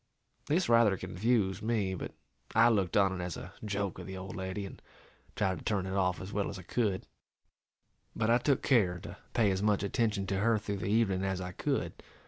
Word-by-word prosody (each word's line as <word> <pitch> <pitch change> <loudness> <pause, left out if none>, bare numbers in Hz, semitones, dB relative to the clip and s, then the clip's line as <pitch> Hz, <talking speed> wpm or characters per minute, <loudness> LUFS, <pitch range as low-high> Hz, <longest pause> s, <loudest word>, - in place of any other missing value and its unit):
This 175 +5 +2
rather 115 -4 +5
confused 95 +1 0
me, 105 -4 0
but 95 - -5 0.4
I 115 +2 +7
looked 100 -6 +1
on 95 -2 +3
it - - -3
as 90 -2 -4
a - - -9
joke 100 -3 -2
of - - -8
the 95 0 -6
old 95 +1 -7
lady, 95 +1 -4
and 95 - -10 0.5
tried 95 -4 0
to - - -12
turn 100 -3 0
it 95 - -4
off 90 -2 +1
as 95 +3 -7
well 100 -1 0
as 100 - -6
I 90 - -9
could; 100 -1 -1 1.1
but 110 - 0
I 120 +2 +5
took 135 +1 +1
care 100 -10 +3
to - - -9 0.2
pay 105 -4 +3
as 95 0 -1
much 105 -1 +2
attention 105 -1 0
to 95 0 -1
her 115 +2 +3
through 100 -1 -3
the 95 - -4
evening 100 -3 +2
as 95 -1 -1
I 90 0 -4
could. - - -2
100 Hz, 215 wpm, -31 LUFS, 95-110 Hz, 1.1 s, I